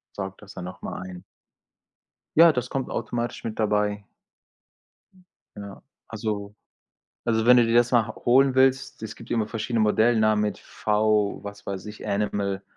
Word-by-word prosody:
saugt 95 -1 -6
das 105 -1 -13
dann 90 - -7
nochmal 90 0 -7
ein. 90 -1 -10 1.1
Ja, 165 0 +8
das 125 -2 -3
kommt 135 -1 -3
automatisch 120 +1 -3
mit 110 -1 -5
dabei. 105 -1 0 1.5
Ja, 100 -1 -9 0.3
also 105 -2 -4 0.7
also 110 -1 +1
wenn 125 +1 +8
du 120 - +5
dir 115 - 0
das 120 0 +4
mal 120 -3 +4
h - - -8
holen 130 +2 +4
willst, 130 -2 +2
es 110 -1 -6
gibt 115 - -13
immer 115 -3 0
verschiedene 115 +1 -2
Modellnamen 110 0 +3
mit 105 - -2
V 105 -1 0
was 100 0 -9
weiß 100 0 -5
ich, 105 0 -9
Animal. 100 -1 -1
110 Hz, 155 wpm, -25 LUFS, 100-120 Hz, 1.5 s, Ja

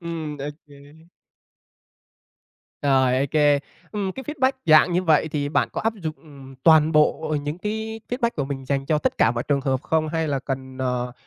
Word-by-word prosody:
Ừm, 165 -3 -5
OK. 145 +1 -11 1.8
Rồi, 130 -2 +3
OK, 145 +1 +3 0.3
ừm, 200 -3 -2
cái 265 - -8
feedback 270 -2 +1
dạng 155 +3 +6
như 180 +2 +1
vậy 160 -2 +3
thì 145 -2 -2
bạn 145 - +1
có - - -3
áp 225 - 0
dụng, 165 -7 -5
ừm, 140 -4 -14
toàn 160 0 +5
bộ 155 0 +2
những 145 +3 -4
cái 220 +2 -4
feedback 245 -1 0
của 145 - -1
mình 135 -1 -5
dành 135 +1 -2
cho 155 +1 +2
tất - - -2
cả 110 - +4
mọi 120 0 -2
trường 140 -1 +2
hợp 135 -1 -1
không, 160 0 0
hay 160 0 -1
là 140 -2 0
cần, 130 -1 -6
ờ, 125 -1 -2
150 Hz, 185 wpm, -23 LUFS, 135-165 Hz, 1.8 s, dạng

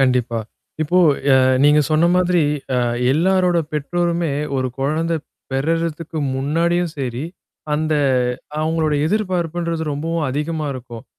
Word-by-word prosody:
கண்டிப்பா. 125 -3 +2 0.4
இப்போ, 175 +4 +2 0.3
அ, - - +7 0.3
நீங்க 150 +1 +6
சொன்ன 155 +2 +4
மாதிரி, 180 -2 +3 0.3
அ, - - +2 0.4
எல்லாரோட 180 +2 +2
பெற்றோருமே 170 +2 -1 0.3
ஒரு 130 -1 0
குழந்தை 160 +5 0 0.4
பெறுறதுக்கு 165 +3 -1 0.2
முன்னாடியும் 165 +5 0
சரி, 130 0 -3 0.5
அந்த 155 +1 0 0.7
அவங்களோட 155 -1 0
எதிர்பார்ப்புன்றது 175 -4 -1
ரொம்பவும் 160 +2 -2
அதிகமா 150 +3 -2
இருக்கும். 120 -3 -9
160 Hz, 105 wpm, -20 LUFS, 145-170 Hz, 0.7 s, அ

